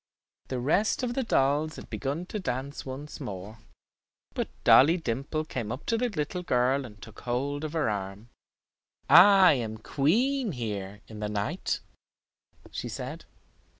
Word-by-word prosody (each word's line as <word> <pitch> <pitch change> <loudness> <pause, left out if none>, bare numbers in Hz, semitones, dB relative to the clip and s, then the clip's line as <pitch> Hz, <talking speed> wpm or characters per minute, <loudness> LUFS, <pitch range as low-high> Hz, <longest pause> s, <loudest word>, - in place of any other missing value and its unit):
The 130 - -3
rest 185 - +1
of 240 -1 -1
the 265 - 0
dolls 150 - +1
had - - -10
begun 145 +6 -3
to 210 - -5
dance 135 -3 -4
once 140 +3 -7
more, 105 -3 -7 0.7
but - - -2
Dolly 160 +7 +7
Dimple 145 +2 -2
came 120 -7 -4
up 130 - -6
to 230 - +1
the 245 +2 0
little 180 -1 -3
girl 130 -3 +1
and 105 -4 -12
took 105 +2 -12
hold 140 +4 -2
of 155 0 -4
her 160 -6 +1
arm. 100 +1 -4 0.8
"I 195 -2 +8
am 115 -5 -3
queen 215 - +1
here 105 -4 -5
in 110 -1 -10
the 105 0 -2
night," 105 - -2 0.9
she - - -5
said. - - -6
135 Hz, 150 wpm, -28 LUFS, 115-165 Hz, 0.9 s, I